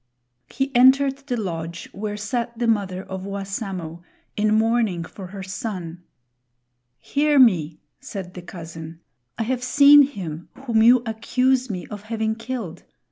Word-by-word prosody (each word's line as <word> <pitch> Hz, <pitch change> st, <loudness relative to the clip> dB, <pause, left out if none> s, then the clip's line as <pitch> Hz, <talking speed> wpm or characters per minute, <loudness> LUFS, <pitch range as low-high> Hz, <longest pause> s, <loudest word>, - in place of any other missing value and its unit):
He 270 Hz, -1 st, -3 dB
entered 265 Hz, +2 st, +5 dB
the 245 Hz, -, -1 dB
lodge 170 Hz, -3 st, -5 dB
where 210 Hz, +1 st, -5 dB
sat 235 Hz, +3 st, -3 dB
the 240 Hz, -, -1 dB
mother 195 Hz, -5 st, 0 dB
of 190 Hz, -1 st, -6 dB
Wassamo 195 Hz, -4 st, -5 dB, 0.3 s
in 210 Hz, 0 st, +1 dB
mourning 220 Hz, -5 st, +2 dB
for 185 Hz, +3 st, -9 dB
her 195 Hz, +1 st, -8 dB
son. 185 Hz, -3 st, -5 dB, 1.0 s
"Hear 295 Hz, -, +1 dB
me," 170 Hz, -, +4 dB, 0.2 s
said 195 Hz, -8 st, -7 dB
the 180 Hz, -, -8 dB
cousin. 165 Hz, -2 st, -9 dB, 0.4 s
"I -, -, 0 dB
have 250 Hz, +2 st, -2 dB
seen 285 Hz, +3 st, +7 dB
him 180 Hz, -, -3 dB, 0.2 s
whom 225 Hz, -3 st, +2 dB
you 240 Hz, +2 st, +6 dB
accuse 255 Hz, +3 st, +1 dB
me 180 Hz, -4 st, -4 dB
of 205 Hz, 0 st, -9 dB
having 220 Hz, 0 st, -1 dB
killed. 230 Hz, -5 st, -6 dB
215 Hz, 140 wpm, -23 LUFS, 180-245 Hz, 1.0 s, seen